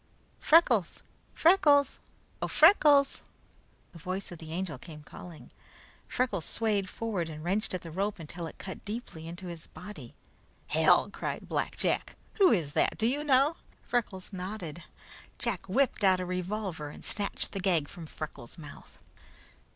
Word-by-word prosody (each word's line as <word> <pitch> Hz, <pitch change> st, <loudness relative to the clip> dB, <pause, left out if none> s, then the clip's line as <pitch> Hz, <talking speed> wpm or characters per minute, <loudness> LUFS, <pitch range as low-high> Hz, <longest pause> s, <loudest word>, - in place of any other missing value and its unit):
"Freckles! 250 Hz, -, +4 dB, 0.3 s
Freckles! 295 Hz, -5 st, +5 dB, 0.4 s
Oh, -, -, 0 dB
Freckles!" 295 Hz, -5 st, +6 dB, 0.7 s
the 170 Hz, -, -12 dB
voice 185 Hz, +3 st, -4 dB
of 175 Hz, -, -8 dB
the 160 Hz, -1 st, -9 dB
Angel 170 Hz, -5 st, -3 dB
came 150 Hz, 0 st, -11 dB
calling. 170 Hz, +1 st, -11 dB, 0.6 s
Freckles 225 Hz, -9 st, 0 dB
swayed 205 Hz, -4 st, 0 dB
forward 200 Hz, -8 st, -3 dB
and 155 Hz, -1 st, -8 dB
wrenched 195 Hz, +3 st, 0 dB
at 180 Hz, -, -5 dB
the 165 Hz, -, -8 dB
rope 195 Hz, +5 st, -1 dB
until 165 Hz, +1 st, -6 dB
it -, -, -11 dB
cut 190 Hz, -, -8 dB
deeply 205 Hz, -7 st, -6 dB
into 175 Hz, +3 st, -7 dB
his 170 Hz, -2 st, -8 dB
body. 205 Hz, +3 st, -10 dB, 0.5 s
"Hell!" -, -, +4 dB
cried -, -, -4 dB
Black -, -, -2 dB
Jack. -, -, 0 dB, 0.2 s
"Who 380 Hz, -3 st, +7 dB
is 165 Hz, -8 st, +1 dB
that? -, -, +2 dB
Do 220 Hz, -, 0 dB
you 280 Hz, +5 st, +1 dB
know?" 285 Hz, +2 st, +4 dB, 0.3 s
Freckles 210 Hz, -6 st, -2 dB
nodded. 180 Hz, -3 st, -5 dB, 0.6 s
Jack 205 Hz, -5 st, -2 dB
whipped 255 Hz, 0 st, +1 dB
out 190 Hz, -2 st, +5 dB
a 185 Hz, -, -2 dB
revolver 180 Hz, -3 st, -3 dB
and -, -, -9 dB
snatched 205 Hz, -2 st, -1 dB
the 195 Hz, -, -4 dB
gag 175 Hz, -6 st, +2 dB
from 165 Hz, +1 st, -9 dB
Freckles' 150 Hz, -4 st, -8 dB
mouth. 150 Hz, -3 st, -12 dB
190 Hz, 150 wpm, -30 LUFS, 170-230 Hz, 0.7 s, Who